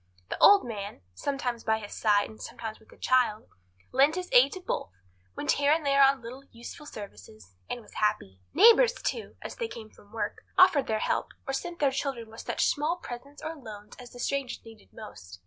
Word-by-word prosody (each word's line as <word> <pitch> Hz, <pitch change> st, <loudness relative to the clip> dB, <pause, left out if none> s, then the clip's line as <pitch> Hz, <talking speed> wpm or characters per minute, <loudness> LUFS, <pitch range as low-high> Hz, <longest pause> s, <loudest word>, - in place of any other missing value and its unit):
The -, -, -3 dB
old 405 Hz, -1 st, +7 dB
man, 205 Hz, -, -6 dB
sometimes 245 Hz, -, -3 dB
by 220 Hz, 0 st, +2 dB
his 205 Hz, -2 st, -8 dB
side 205 Hz, -2 st, +2 dB
and 220 Hz, -, -13 dB
sometimes 220 Hz, -1 st, -7 dB
with 220 Hz, -, -23 dB
the -, -, -17 dB
child, 245 Hz, -4 st, +1 dB, 0.4 s
lent 280 Hz, +5 st, +4 dB
his 365 Hz, 0 st, -4 dB
aid 260 Hz, +3 st, +6 dB
to 375 Hz, -, -6 dB
both, 365 Hz, -, -3 dB, 0.5 s
went 145 Hz, -, 0 dB
here 285 Hz, 0 st, +2 dB
and 315 Hz, -1 st, +2 dB
there 275 Hz, 0 st, +4 dB
on 270 Hz, -2 st, +4 dB
little, 255 Hz, +4 st, -9 dB
useful 240 Hz, +5 st, -10 dB
services, 110 Hz, -, -11 dB, 0.2 s
and 245 Hz, -, -4 dB
was -, -, -18 dB
happy. 95 Hz, -, -1 dB
Neighbours, 470 Hz, +3 st, +7 dB
too, 460 Hz, -, -4 dB
as -, -, -7 dB
they 465 Hz, -, -2 dB
came 220 Hz, -, -10 dB
from 205 Hz, -, -21 dB
work, 225 Hz, -, -4 dB
offered 345 Hz, -7 st, +6 dB
their 220 Hz, -, 0 dB
help -, -, 0 dB, 0.2 s
or 270 Hz, -, -3 dB
sent 345 Hz, +5 st, -4 dB
their 285 Hz, -4 st, +2 dB
children 265 Hz, -4 st, -4 dB
with 225 Hz, -, -9 dB
such -, -, 0 dB
small 305 Hz, +3 st, +1 dB
presents 280 Hz, -3 st, -10 dB
or 320 Hz, +1 st, -4 dB
loans 215 Hz, -7 st, -11 dB
as 245 Hz, -1 st, -10 dB
the 245 Hz, -, -13 dB
strangers 275 Hz, -1 st, -3 dB
needed 225 Hz, -2 st, -15 dB
most. 90 Hz, -, -11 dB
245 Hz, 205 wpm, -28 LUFS, 215-285 Hz, 0.5 s, old